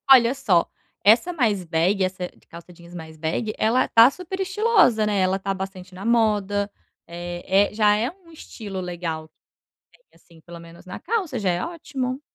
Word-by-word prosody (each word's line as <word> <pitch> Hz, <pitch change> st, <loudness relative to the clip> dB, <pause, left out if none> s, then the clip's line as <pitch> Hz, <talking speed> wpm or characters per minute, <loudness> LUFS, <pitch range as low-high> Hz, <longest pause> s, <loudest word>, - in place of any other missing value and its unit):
olha 240 Hz, 0 st, +3 dB
só, 200 Hz, -11 st, +2 dB, 0.3 s
essa 235 Hz, -, +4 dB
mais 215 Hz, -, 0 dB
bag, 175 Hz, +5 st, +1 dB
essa 185 Hz, 0 st, -3 dB
c -, -, -9 dB, 0.2 s
calça 170 Hz, +1 st, -12 dB
jeans 170 Hz, +1 st, -16 dB
mais 160 Hz, -1 st, -10 dB
bag, 170 Hz, +8 st, -2 dB
ela 240 Hz, +4 st, +2 dB
tá 230 Hz, +3 st, +7 dB
super 365 Hz, +4 st, -7 dB
estilosa, 385 Hz, -, +3 dB
né, 205 Hz, -2 st, 0 dB
ela 190 Hz, +1 st, +1 dB
tá 195 Hz, 0 st, -2 dB
bastante 190 Hz, -1 st, -8 dB
na 195 Hz, -, -8 dB
moda. 205 Hz, -3 st, +1 dB, 0.4 s
Eh, 175 Hz, +3 st, 0 dB
é, -, -, -16 dB
já 210 Hz, -1 st, +3 dB
é 230 Hz, +4 st, 0 dB
um 355 Hz, -3 st, -21 dB
estilo 205 Hz, -10 st, -8 dB
legal. 170 Hz, -3 st, -5 dB, 0.6 s
Bem, -, -, -26 dB
assim, 165 Hz, -2 st, -21 dB
pelo 170 Hz, -1 st, -11 dB
menos 170 Hz, +1 st, -14 dB
na 185 Hz, -, -8 dB
calça, 370 Hz, -, -2 dB
já 195 Hz, -3 st, 0 dB
é 175 Hz, -, -1 dB
ótimo. 275 Hz, -6 st, -4 dB
200 Hz, 180 wpm, -23 LUFS, 175-250 Hz, 0.6 s, tá